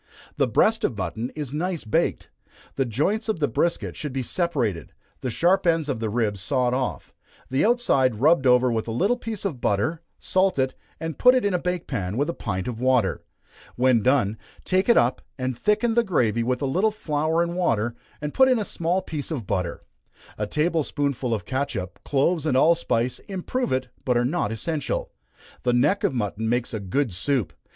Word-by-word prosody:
The - - +3
breast - - +2
of - - 0
mutton 115 +3 -3
is 145 -3 -5
nice 170 0 -2
baked. 110 - 0 0.5
The 135 - +1
joints 185 - 0
of 220 - +1
the 145 - +2
brisket 170 +8 -1
should 150 -4 -5
be 130 -1 -2
separated, 125 - -1 0.3
the 130 - -2
sharp 180 - +2
ends 165 -3 +2
of 135 -6 -2
the 110 -1 -2
ribs 105 -3 -1
sawed 125 +3 +1
off, 130 -1 -3 0.4
the 130 - +2
outside 210 - +3
rubbed 135 +3 +3
over 125 0 +5
with 115 -1 -1
a - - -2
little 195 - +2
piece 225 -4 -5
of 145 -11 -3
butter 105 +12 0 0.2
salt 185 -2 +1
it, 130 -1 +1 0.3
and 160 -1 -5
put 250 0 +7
it 255 - +1
in 200 - +1
a 180 - +1
bake 180 -1 -2
pan, 100 -5 -3
with 145 +5 +1
a - - -8
pint 95 - -3
of 120 -2 -4
water. 125 -7 +2 0.5
When 125 -2 +3
done, 110 -3 +2 0.3
take 190 +4 +1
it 235 - +6
up, 120 +2 +2 0.2
and 130 -1 -2
thicken 210 - +1
the 235 +1 +3
gravy 120 - +1
with 125 +3 -1
a - - +2
little 185 +11 +2
flour 160 -4 0
and 170 0 -3
water, 120 -10 +1 0.3
and 150 0 -4
put 265 - +5
in 255 - +4
a 215 - -1
small 175 +2 -1
piece 150 -5 -5
of 140 -10 -4
butter. 90 -2 -2 0.5
A 105 - -3
table 160 +5 +1
spoonful 140 -4 -2
of 105 -6 -1
catsup, 120 -9 -3
cloves 155 +4 +1
and 130 -4 +2
allspice, 130 -6 +2
improve 200 +7 -2
it, 130 -1 -1
but 125 -2 +2
are 120 - +2
not 135 -5 0
essential. 145 +6 -3 0.5
The 125 - +1
neck 150 +11 +2
of - - +2
mutton 110 -1 -2
makes 120 0 -1
a 110 - -2
good 105 +4 -1
soup. 120 +4 -1
135 Hz, 200 wpm, -24 LUFS, 120-170 Hz, 0.5 s, put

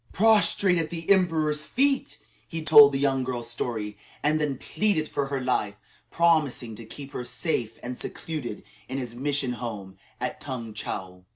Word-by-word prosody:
Prostrate 200 -4 +4
at 160 -1 -2
the 165 -1 -6
emperor's 160 -5 +2
feet, 275 +1 +1 0.3
he 165 -1 -5
told 145 -2 +9
the 135 - -1
young 135 -1 +1
girl's 120 -2 -4
story, 110 -3 -4 0.2
and 155 +1 +2
then 145 -3 -1
pleaded 200 -4 0
for 140 -1 -2
her 135 0 -2
life, 125 -5 0 0.3
promising 155 -9 +2
to 115 +1 -10
keep 140 +5 -10
her 125 - -4
safe 120 -3 -2
and 125 0 -5
secluded 145 -10 -5 0.3
in 130 - -3
his 125 -3 -4
mission 140 +1 -1
home 100 -6 -7 0.2
at - - -4
Tung 120 -5 -5
Chow. 90 -3 -6
135 Hz, 165 wpm, -26 LUFS, 120-160 Hz, 0.3 s, told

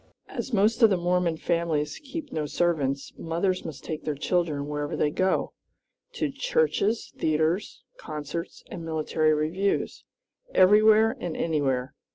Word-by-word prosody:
As - - -5
most 220 +3 +2
of 225 - +8
the 190 - +2
Mormon 175 -1 +1
families 160 -3 -1
keep 295 0 -6
no 150 -1 -2
servants, 140 -5 0
mothers 175 +3 -1
must 155 -4 -8
take 155 -1 -5
their 150 - -2
children 155 -2 0
wherever 150 0 -3
they 150 - +1
go 185 +3 0 0.6
to 480 - -1
churches, 470 - 0
theatres, 160 +5 0 0.2
concerts, 155 - -6
and 170 - -6
military 155 -1 +1
reviews 170 +7 -1 0.5
everywhere 215 +3 +6
and 175 -3 -4
anywhere. 135 -5 0
170 Hz, 135 wpm, -26 LUFS, 150-200 Hz, 0.6 s, of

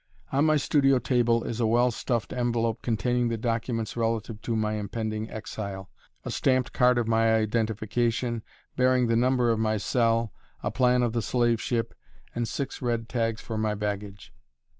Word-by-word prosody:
On 140 +3 +3
my 155 -1 +4
studio 135 -2 +3
table 120 -2 +2
is 115 - -4
a 115 - +2
well 120 +2 +3
stuffed 120 0 -2
envelope 120 -2 0
containing 120 +1 0
the 115 -1 -1
documents 115 0 -2
relative 115 -1 -2
to 115 - -2
my 110 -1 0
impending 110 +1 -3
exile 100 -3 -6 0.3
a - - -3
stamped 130 -2 +1
card 125 0 +4
of 120 -2 0
my 115 0 +3
identification, 115 +2 0 0.3
bearing 130 -1 +3
the 115 -1 +1
number 125 0 +3
of 115 - 0
my 110 -1 +1
cell, 115 0 +1 0.3
a - - -1
plan 125 -1 +3
of 120 -2 0
the 120 - 0
slave 120 0 +1
ship, 115 -2 -1 0.4
and 120 -1 -2
six 135 +2 -4
red 115 -2 -1
tags 115 -2 -1
for 110 -2 -4
my 110 -1 0
baggage. 100 -1 -5
115 Hz, 170 wpm, -27 LUFS, 110-125 Hz, 0.4 s, my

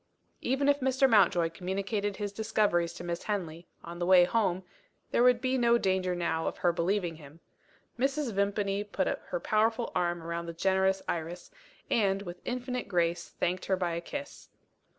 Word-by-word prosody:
Even 270 +3 0
if 285 0 +4
Mr. 265 0 +3
Mountjoy 180 -7 +4
communicated 195 +3 -2
his 205 -1 -4
discoveries 205 -6 +1
to 175 - -9
Miss 170 0 -3
Henley, 175 -5 -3 0.2
on 170 +1 -8
the 175 - 0
way 185 -1 +8
home, 190 -2 +1 0.5
there - - +2
would 250 -1 +5
be 260 0 +1
no 235 0 +4
danger 185 -3 0
now 170 -2 -1
of - - -3
her 175 - +2
believing 175 -1 -1
him. 150 +1 -14 0.6
Mrs. 270 -1 0
Vimpany 200 0 0
put 210 - -2
her - - -3
powerful 225 - +1
arm 175 -2 -1
round 170 0 -4
the - - -5
generous 190 +2 +1
Iris, 170 - -4 0.4
and, 200 -3 +1
with 175 -1 -8
infinite 250 0 -3
grace, 170 -2 0
thanked 180 +1 -2
her 190 - +1
by 175 -2 -1
a 170 - -3
kiss. 285 +10 -8
190 Hz, 170 wpm, -30 LUFS, 175-225 Hz, 0.6 s, way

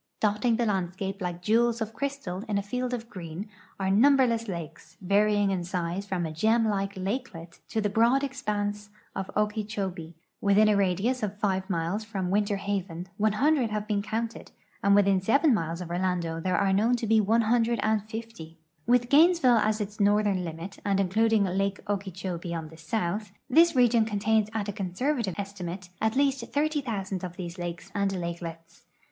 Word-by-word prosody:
Dotting 215 +3 +2
the 235 +1 0
landscape 195 0 -2
like 175 -1 -4
jewels 230 +3 +2
of 220 -1 -3
crystal 255 -7 -4
in 205 - +1
a 200 - -1
field 250 +4 -3
of 235 -2 -4
green 185 -2 -7 0.3
are 190 0 0
num 275 +8 +6
berless 230 -3 +2
lakes, 170 -4 -7
varying 205 +1 +2
in 185 -2 -1
size 180 +2 -3
from 180 -3 -1
a 160 - -4
gem 220 +8 +2
like 195 -1 -1
lakelet 185 -4 -5
to 225 - -1
the 210 - +1
broad 235 +6 +3
expanse 210 -6 -3 0.3
of 190 -1 -4
Okeechobee. 205 -6 -2 0.3
Within 205 +1 +5
a 210 - +4
radius 200 +6 +1
of 205 -1 -3
5 190 -2 -1
miles 175 +4 -1
from 195 -4 -3
Winter 205 0 +1
Haven 190 -3 -4
100 230 +5 +2
have 210 0 -2
been 210 -2 0
counted, 225 +2 -4 0.3
and 200 0 +4
within 195 -2 +4
7 275 - +4
miles 165 -3 -2
of 170 -1 -6
Orlando 175 -2 -1
there 185 +2 0
are 195 -1 +2
known 225 +5 +3
to 240 - -3
be 220 0 +4
150. 220 -4 0 0.3
Mhth 245 0 +4
Gainesville 300 -5 +5
as 215 0 +1
its 210 +1 -5
northern 205 -2 +2
limit 170 +3 -7
and 200 -1 +1
including 215 +3 +3
lake 195 +1 -1
Okeechobee 185 -3 -3
on 160 -2 -5
the 160 - -14
south, 200 +4 -3
this 330 +4 +5
region 240 -3 +4
contains 215 0 +1
at 220 -2 -3
a 205 - -3
conservative 200 - -2
estimate 185 -3 -6
at 220 +2 +1
least 275 -2 +2
30,000 240 - -1
of 180 -1 -5
these 175 0 -6
lakes 175 +2 -6
and 200 -1 0
lakelets. 170 -2 -6
205 Hz, 170 wpm, -27 LUFS, 185-225 Hz, 0.3 s, num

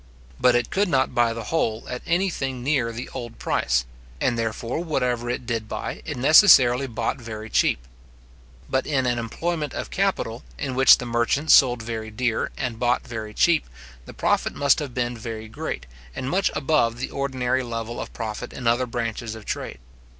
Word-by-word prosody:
But 125 -1 +5
it 120 -1 0
could 200 0 +1
not 130 -4 +1
buy 120 -1 +3
the 115 0 -5
whole 115 -5 -1
at 125 -1 -5
any 180 +3 +2
thing 130 -5 -4
near 130 -4 +1
the 120 +2 -6
old 120 -3 -7
price; 65 0 0 0.3
and 120 - +1
therefore, 115 +6 -2
whatever 125 -7 -1
it 125 +1 -3
did 115 -2 -2
buy, - - -5
it - - -4
necessarily 135 - +6
bought 115 0 -2
very 110 -1 -7
cheap. - - +2 0.8
But 130 - 0
in 135 -3 +1
an 120 -1 +1
employment 150 +6 -3
of - - -5
capital, 185 -12 -1 0.2
in 135 -2 -3
which 135 +1 +7
the 125 - -6
merchant 120 +6 +1
sold 125 -4 +6
very 110 -1 -5
dear, 115 +1 -1
and 115 -3 -3
bought 125 0 +1
very 110 -3 -6
cheap, 170 -2 +3 0.4
the - - -9
profit - - 0
must 140 -2 +3
have 140 -5 -6
been 120 -1 -1
very 110 -1 -6
great, 110 - -5 0.3
and 130 - -4
much 195 +2 +2
above 140 -6 +1
the 130 - -4
ordinary 130 -2 -1
level 115 -1 -4
of - - -7
profit 110 +1 -5
in 125 - -7
other 120 +2 +2
branches 115 -1 -3
of 110 - -11
trade. - - -4
120 Hz, 185 wpm, -24 LUFS, 115-135 Hz, 0.8 s, which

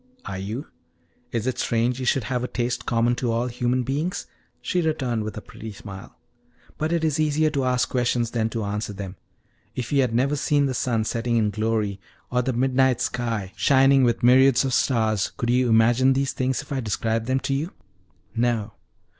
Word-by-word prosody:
"Are 95 - -5
you? 110 +9 -4 0.7
Is 115 -1 -2
it 130 -1 -2
strange 120 +2 0
you 130 - -3
should 135 -1 +2
have 125 +3 -2
a - - -1
taste 120 -1 -3
common 120 +1 +2
to 120 -2 -1
all 115 +2 0
human 125 +1 0
beings?" 155 - -2 0.3
she 180 - -1
returned 130 -8 -1
with 110 0 -6
a - - -5
pretty 110 - -9
smile. 95 -1 -10 0.6
"But 155 +1 -1
it 170 -1 +1
is 155 -2 +1
easier 155 0 +2
to 140 -3 0
ask 125 -1 +2
questions 120 -2 0
than 115 -2 0
to 115 -1 -3
answer 105 +1 -3
them. 95 -2 -7 0.6
If 125 -2 -4
you 140 -1 +4
had 125 -3 +1
never 135 +4 +2
seen 145 0 +2
the 135 - -1
sun 120 -3 0
setting 115 +1 -1
in 105 -2 +2
glory, 110 -2 -1 0.3
or 125 0 +2
the 130 +1 -1
midnight 130 +1 +2
sky 115 -6 -2
shining 135 0 +4
with 120 -2 +1
myriads 130 +2 +5
of 130 - -1
stars, 110 -7 +1
could 120 0 0
you 125 0 +2
imagine 120 +4 +4
these 135 0 0
things 130 +1 -1
if 145 - -18
I 135 - -1
described 115 0 -1
them 130 +1 +1
to 135 +1 -1
you?" 150 +7 -2 0.6
"No." 115 -3 0
125 Hz, 195 wpm, -24 LUFS, 115-135 Hz, 0.7 s, myriads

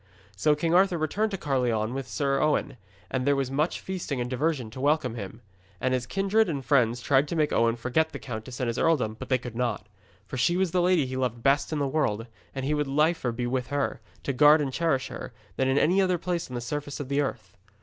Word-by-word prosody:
So 150 -1 +3
King 165 +2 0
Arthur 185 0 +4
returned 195 +8 0
to 195 - -3
Caerleon 125 -7 0
with 135 -2 -4
Sir 140 -1 0
Owen, 145 -3 +1 0.3
and 130 -1 0
there 145 - +4
was 135 -1 -1
much 150 +5 0
feasting 180 -8 -4
and 120 - -1
diversion 130 -2 -1
to 130 - -7
welcome 145 -4 +2
him. 110 0 -7 0.4
And 130 0 0
his 125 -1 -1
kindred 195 - +2
and 140 -5 -3
friends 120 -4 +3
tried 140 +1 +3
to 170 - -3
make 155 -2 +1
Owen 115 0 +3
forget 130 +7 0
the - - -6
countess 120 0 -7
and 130 - 0
his 115 +1 -2
earldom, 130 -10 +2
but - - -7
they 130 - +4
could 120 -2 -8
not. 120 0 -1 0.4
For 130 - -6
she 170 +8 +2
was 185 -2 +1
the 180 0 +2
lady 175 -4 +3
he 130 0 -4
loved 120 -3 -2
best 140 +3 +2
in 155 - -1
the 140 -1 0
world, 115 -7 0 0.3
and 135 0 -3
he 150 - +1
would 150 -1 0
liefer 150 -2 +1
be 120 +1 -3
with 125 0 -1
her, 140 -3 -2 0.2
to 140 - -1
guard 150 +4 +7
and 140 -3 -2
cherish 140 -5 0
her, - - -7 0.2
than 130 - +1
in 130 +1 +2
any 185 +7 +4
other 185 -2 +2
place 175 -2 -3
on 125 - -6
the 120 - -3
surface 145 +3 -4
of 145 - -4
the 140 +2 +1
earth. 135 - -5
135 Hz, 240 wpm, -27 LUFS, 125-155 Hz, 0.4 s, guard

